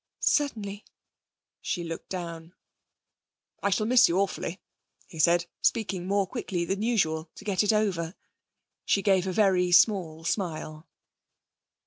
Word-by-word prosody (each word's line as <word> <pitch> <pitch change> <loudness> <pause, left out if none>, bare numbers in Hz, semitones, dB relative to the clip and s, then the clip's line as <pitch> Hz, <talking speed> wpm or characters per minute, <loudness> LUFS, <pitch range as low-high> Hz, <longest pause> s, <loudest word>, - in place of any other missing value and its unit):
'Certainly.' 210 -9 0 0.8
She 175 - -3
looked 165 -1 -7
down. 170 -2 -6 1.1
'I 200 - +1
shall 215 +2 +1
miss 250 +2 +5
you 170 - +1
awfully,' 190 -2 -2 0.5
he 160 - -12
said, 170 +2 +4 0.2
speaking 195 -5 0
more 200 0 +2
quickly 185 -5 -3
than 195 +3 -2
usual 165 -9 0
to - - -12
get 195 -3 +1
it 210 - +3
over. 195 -5 0 0.7
She 200 - +1
gave 190 -2 +2
a - - -1
very 185 -2 +2
small 175 -4 +3
smile. 160 -3 -3
185 Hz, 130 wpm, -27 LUFS, 170-205 Hz, 1.1 s, miss